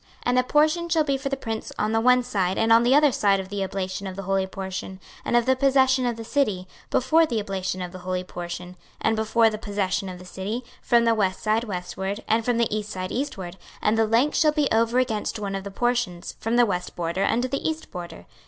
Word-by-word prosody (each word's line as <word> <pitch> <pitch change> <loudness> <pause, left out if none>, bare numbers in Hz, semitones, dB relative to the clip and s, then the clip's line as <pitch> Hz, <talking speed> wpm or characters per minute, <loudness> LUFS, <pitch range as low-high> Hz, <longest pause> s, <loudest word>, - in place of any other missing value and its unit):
26:045:007 - - -30
And 250 +1 +2
a - - +3
portion 310 +5 +2
shall 325 -2 +3
be 280 -2 0
for 275 - -3
the 275 - -2
prince 225 -4 -5
on 215 - 0
the 225 0 +2
one 250 +1 +5
side 190 -5 -1
and 225 0 +4
on 230 - +7
the 245 +3 +4
other 295 -1 +5
side 200 -4 +2
of 190 0 -6
the 200 -1 -2
oblation 190 0 -4
of 190 - -6
the 195 - -6
holy 195 0 0
portion, 190 0 -6 0.2
and 240 - +2
of 240 - +2
the 260 - +3
possession 265 -1 +3
of 240 - -1
the 225 - -6
city, 215 -8 0 0.2
before 315 +6 +3
the 235 -6 -1
oblation 190 -2 -3
of 180 - -6
the 185 - -9
holy 185 0 -3
portion, 180 0 -7 0.2
and 220 - +1
before 220 +1 +3
the 215 - -5
possession 200 -2 -2
of 180 - -7
the 180 - -12
city, 200 +7 -4 0.2
from 235 -1 +3
the 230 - +4
west 190 -4 0
side 220 +2 +1
westward, 190 0 -4
and 225 +1 +2
from 245 0 +1
the 230 -2 +1
east 210 -1 -3
side 185 -2 -4
eastward: 195 -10 -4 0.2
and 210 - +2
the 225 0 +2
length 235 +7 +2
shall 310 -2 +4
be 300 -2 +1
over 230 +2 +2
against 225 -5 0
one 200 -2 -4
of 195 0 -3
the 200 - -6
portions, 240 -5 -1
from 225 +2 -1
the 240 0 +6
west 180 -4 -3
border 170 +2 -1
unto 245 +5 +1
the 275 +2 -2
east 315 0 -6
border. 175 - -8
220 Hz, 245 wpm, -24 LUFS, 190-245 Hz, 0.2 s, on